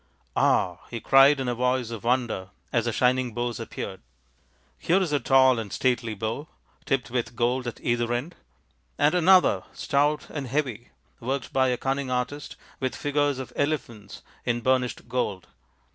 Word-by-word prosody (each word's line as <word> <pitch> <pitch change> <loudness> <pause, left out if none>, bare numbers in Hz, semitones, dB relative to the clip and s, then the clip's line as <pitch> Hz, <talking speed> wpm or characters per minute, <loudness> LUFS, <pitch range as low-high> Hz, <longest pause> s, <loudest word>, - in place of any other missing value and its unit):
" - - -40
Ah! 90 -2 +2
" - - -22
he 120 - -5
cried 135 +4 +6
in 130 - -2
a 120 - +1
voice 125 0 0
of 115 -3 -6
wonder, 120 -6 0 0.2
as 115 -2 +2
the 120 - 0
shining 125 0 +1
bows 120 0 -2
appeared, 100 -4 -6 0.8
"here 180 +3 +3
is 180 -5 -1
a 145 - +3
tall 130 -1 +5
and 105 -3 -6
stately 120 -3 0
bow, 110 +9 -4 0.4
tipped 130 -3 -1
with 120 -1 -2
gold 125 +2 0
at 120 - -5
either 120 0 0
end; 125 +9 -2 0.6
and 145 +3 +3
another, 180 +1 +5
stout 145 +1 +1
and 145 -3 -4
heavy, 125 -4 -2 0.3
worked 130 +2 -3
by 130 -1 +3
a 125 -1 +1
cunning 135 +1 -2
artist 125 +3 -3 0.2
with 130 -1 -2
figures 145 -1 0
of 130 - -7
elephants 120 -9 -3 0.2
in 120 0 -1
burnished 130 0 0
gold." 105 -7 -2
125 Hz, 170 wpm, -26 LUFS, 120-140 Hz, 0.8 s, cried